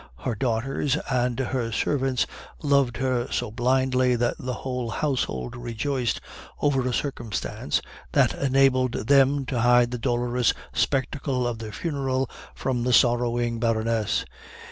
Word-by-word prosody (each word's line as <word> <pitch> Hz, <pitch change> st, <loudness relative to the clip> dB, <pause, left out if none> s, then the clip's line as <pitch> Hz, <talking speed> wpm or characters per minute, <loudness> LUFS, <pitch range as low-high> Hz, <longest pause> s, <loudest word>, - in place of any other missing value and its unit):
Her 125 Hz, -, 0 dB
daughters 125 Hz, +5 st, 0 dB
and 125 Hz, -1 st, +1 dB
her 125 Hz, -3 st, -1 dB
servants 135 Hz, +2 st, +1 dB, 0.4 s
loved 140 Hz, -4 st, +2 dB
her 125 Hz, -2 st, 0 dB
so -, -, -1 dB
blindly 130 Hz, +1 st, +2 dB
that 120 Hz, 0 st, +1 dB
the 125 Hz, -1 st, -3 dB
whole 125 Hz, -2 st, -2 dB
household 110 Hz, -, -2 dB
rejoiced 120 Hz, 0 st, -2 dB, 0.4 s
over 135 Hz, -3 st, +1 dB
a -, -, 0 dB
circumstance 120 Hz, -4 st, -2 dB, 0.3 s
that -, -, +4 dB
enabled 130 Hz, -2 st, +3 dB
them 135 Hz, +3 st, +3 dB
to 125 Hz, -2 st, -1 dB
hide 120 Hz, 0 st, +5 dB
the 125 Hz, -, -3 dB
dolorous 120 Hz, 0 st, +1 dB, 0.2 s
spectacle 135 Hz, -1 st, 0 dB
of 120 Hz, -2 st, -2 dB
the 110 Hz, -1 st, -6 dB
funeral 135 Hz, -2 st, -1 dB, 0.3 s
from 125 Hz, -2 st, -1 dB
the 125 Hz, +1 st, +1 dB
sorrowing 120 Hz, -1 st, +3 dB
Baroness. 115 Hz, -1 st, 0 dB
125 Hz, 130 wpm, -25 LUFS, 120-135 Hz, 0.4 s, hide